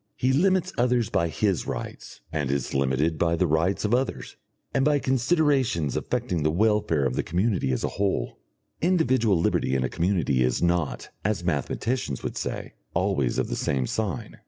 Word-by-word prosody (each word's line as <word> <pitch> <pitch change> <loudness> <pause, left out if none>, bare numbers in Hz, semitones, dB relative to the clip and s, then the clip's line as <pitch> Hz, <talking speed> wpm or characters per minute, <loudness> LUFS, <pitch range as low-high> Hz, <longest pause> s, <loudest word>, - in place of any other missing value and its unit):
He 130 +1 +1
limits 185 +4 +2
others 120 -3 +2
by 85 - +2
his 95 +3 0
rights, - - -6
and 75 -4 -1
is 70 -2 -1
limited 70 +4 +1
by 85 0 +2
the 90 - +2
rights 85 +6 +1
of 105 - +1
others, 130 +2 -1 0.4
and 135 - +2
by 150 +1 +4
considerations 130 - +1
affecting 85 -3 -1
the 75 - +2
welfare 95 -5 +2
of 65 - 0
the - - +1
community 90 - 0
as 65 - -1
a - - +1
whole. 95 -12 -1 0.4
Individual 130 - +3
liberty 75 -4 +1
in 65 - +1
a 65 - -1
community 85 -7 +1
is 60 -1 +2
not, 85 -3 0
as 105 -3 -1
mathematicians 85 - -2
would - - -4
say, - - -4 0.2
always 65 -4 +1
of - - 0
the - - -3
same 65 -2 0
sign. 100 - -3
90 Hz, 175 wpm, -26 LUFS, 75-125 Hz, 0.4 s, by